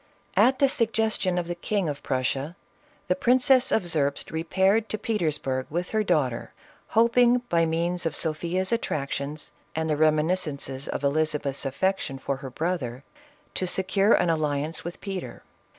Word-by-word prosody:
At 260 Hz, +1 st, +5 dB
the 275 Hz, -, +4 dB
suggestion 220 Hz, -7 st, +1 dB
of 175 Hz, -, 0 dB
the 175 Hz, -, -2 dB
King 190 Hz, +2 st, -1 dB
of 145 Hz, -2 st, -4 dB
Prussia, 135 Hz, +4 st, -2 dB, 0.5 s
the 180 Hz, -, +2 dB
Prin 245 Hz, +5 st, +4 dB
cess 260 Hz, 0 st, +4 dB
of 200 Hz, -5 st, +1 dB
Zerbst 145 Hz, -4 st, 0 dB
repaired 190 Hz, +7 st, +1 dB
to 215 Hz, -, -1 dB
Petersburg 150 Hz, -, -1 dB
with 175 Hz, +3 st, -3 dB
her 220 Hz, -1 st, +1 dB
daugh 155 Hz, -9 st, +2 dB
ter, 115 Hz, -, -7 dB, 0.4 s
hoping 240 Hz, +2 st, +4 dB
by 165 Hz, -1 st, +3 dB
means 170 Hz, +1 st, 0 dB
of -, -, -3 dB
Sophia's 170 Hz, +4 st, -1 dB
attractions 145 Hz, -8 st, -3 dB, 0.2 s
and 160 Hz, 0 st, -1 dB
the 155 Hz, -, +1 dB
reminiscences 155 Hz, -3 st, +1 dB
of -, -, -4 dB
Elizabeth's 145 Hz, -1 st, 0 dB
affection 150 Hz, -1 st, -1 dB
for 135 Hz, 0 st, -3 dB
her 135 Hz, -1 st, -7 dB
brother, 135 Hz, -4 st, -3 dB, 0.5 s
to 185 Hz, -, -1 dB
secure 195 Hz, +3 st, +2 dB
an 175 Hz, -1 st, +3 dB
alliance 155 Hz, 0 st, -1 dB
with 175 Hz, +1 st, -7 dB
Peter. 195 Hz, -3 st, -6 dB
170 Hz, 155 wpm, -26 LUFS, 145-195 Hz, 0.5 s, At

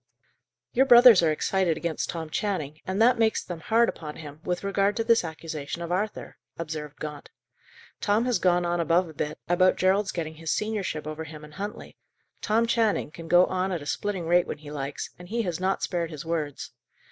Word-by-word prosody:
"Your 265 Hz, +2 st, +4 dB
brothers 240 Hz, -5 st, +9 dB
are 165 Hz, -2 st, +3 dB
excited 175 Hz, +1 st, +1 dB
against 170 Hz, -2 st, -3 dB
Tom 160 Hz, -2 st, -5 dB
Channing, 155 Hz, -8 st, -2 dB
and 190 Hz, +2 st, -2 dB
that 240 Hz, +2 st, +5 dB
makes 220 Hz, -1 st, +2 dB
them 175 Hz, -2 st, -6 dB
hard 230 Hz, +8 st, +3 dB
upon 150 Hz, -2 st, -5 dB
him, 150 Hz, -1 st, -10 dB
with 180 Hz, 0 st, -2 dB
regard 200 Hz, +1 st, +1 dB
to 225 Hz, -, +1 dB
this 230 Hz, -2 st, +4 dB
accusation 160 Hz, -1 st, -5 dB
of 170 Hz, -, -5 dB
Arthur," 205 Hz, +4 st, -3 dB, 0.2 s
observed 155 Hz, -3 st, -6 dB
Gaunt. 150 Hz, -2 st, -7 dB, 0.7 s
"Tom 210 Hz, +4 st, +2 dB
has 250 Hz, -2 st, +1 dB
gone 175 Hz, -1 st, +2 dB
on 175 Hz, 0 st, 0 dB
above 170 Hz, +2 st, +2 dB
a 160 Hz, -, -11 dB
bit, 150 Hz, +1 st, -3 dB
about 185 Hz, +1 st, +4 dB
Gerald's 190 Hz, +2 st, +2 dB
getting 160 Hz, -2 st, -5 dB
his 165 Hz, 0 st, -6 dB
seniorship 200 Hz, -8 st, -2 dB
over 155 Hz, +1 st, -5 dB
him 155 Hz, -1 st, -10 dB
and 150 Hz, 0 st, -12 dB
Huntley. 205 Hz, +5 st, -7 dB, 0.4 s
Tom 225 Hz, +2 st, +2 dB
Channing 225 Hz, -8 st, +1 dB
can 165 Hz, +1 st, -10 dB
go 175 Hz, +2 st, +6 dB
on 185 Hz, +1 st, -1 dB
at 170 Hz, -5 st, -3 dB
a -, -, -11 dB
splitting 190 Hz, +3 st, -2 dB
rate 175 Hz, +1 st, +3 dB
when -, -, -4 dB
he 150 Hz, -1 st, -11 dB
likes, 140 Hz, -1 st, -5 dB
and 180 Hz, 0 st, -11 dB
he 230 Hz, +2 st, -1 dB
has 175 Hz, -4 st, -3 dB
not 190 Hz, +1 st, 0 dB
spared 170 Hz, -2 st, -1 dB
his 155 Hz, -1 st, -8 dB
words. 155 Hz, -4 st, -3 dB
175 Hz, 205 wpm, -26 LUFS, 155-205 Hz, 0.7 s, brothers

